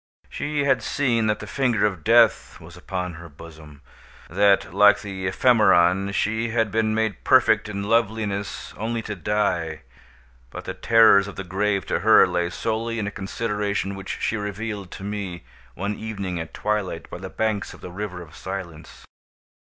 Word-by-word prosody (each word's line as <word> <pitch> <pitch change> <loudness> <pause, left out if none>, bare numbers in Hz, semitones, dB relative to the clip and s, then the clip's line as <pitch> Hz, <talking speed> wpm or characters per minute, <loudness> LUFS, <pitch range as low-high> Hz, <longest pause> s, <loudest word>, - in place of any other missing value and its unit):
She 145 0 -2
had 135 -3 +2
seen 120 -6 0
that 105 0 +1
the 105 - -8
finger 120 -2 +1
of 95 -6 -2
Death 115 0 +3
was - - -13
upon 90 -1 -5
her 85 +1 -11
bosom—that, 80 +5 -3
like 105 0 +5
the 95 -2 -4
ephemeron, 95 -5 +3
she 110 +3 -1
had 115 -2 0
been 110 0 +1
made 110 -4 -1
perfect - - +4
in 100 -1 -4
loveliness 105 -2 -1
only 115 +2 -3
to 105 - -5
die; 85 -4 -1 0.7
but - - -9
the - - -4
terrors 110 -3 +5
of 100 - -8
the 95 - -5
grave 100 +1 -1
to - - -1
her - - +6
lay 90 -1 -1
solely 115 +4 -3
in 110 - -2
a 100 - -3
consideration 100 0 -3
which 95 -1 -6
she 115 - -1
revealed 105 -1 -5
to 95 - -9
me, 100 -4 -5 0.3
one 100 +3 -2
evening 100 -5 -5
at 80 0 -6
twilight, 105 -6 -3
by - - -7
the 95 +1 -7
banks 105 0 -2
of - - -18
the 90 - -8
River 90 -2 -6
of 80 -2 -16
Silence. 95 -4 -8
100 Hz, 165 wpm, -23 LUFS, 95-110 Hz, 0.7 s, her